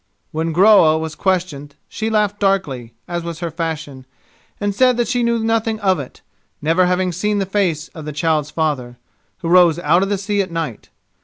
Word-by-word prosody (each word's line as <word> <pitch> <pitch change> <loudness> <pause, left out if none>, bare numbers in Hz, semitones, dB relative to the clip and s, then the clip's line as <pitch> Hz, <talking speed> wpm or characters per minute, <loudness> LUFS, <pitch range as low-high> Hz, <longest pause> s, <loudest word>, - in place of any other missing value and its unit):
When 160 +1 -2
Groa 175 -3 +5
was 160 -1 -4
questioned 165 -6 -2
she 220 0 -3
laughed 210 -2 0
darkly, 150 - -1
as 175 0 -3
was 170 -1 -6
her 170 0 -4
fashion, 150 -5 -5 0.5
and 205 -1 -1
said 250 +3 +3
that 240 -2 +1
she 245 +1 0
knew 235 0 +1
nothing 225 -1 0
of 190 -4 +2
it, 135 - -9 0.4
never 165 +4 +2
having 180 0 +1
seen 210 +5 -1
the 195 - 0
face 180 -5 -1
of 160 -2 -10
the 150 - -4
child's 150 0 0
father, 140 -7 -2 0.5
who - - -2
rose 175 -2 +5
out 175 +1 +2
of 195 - 0
the 205 - 0
sea 200 +1 -1
at 190 - -4
night. 165 -12 -5
175 Hz, 190 wpm, -19 LUFS, 155-205 Hz, 0.5 s, Groa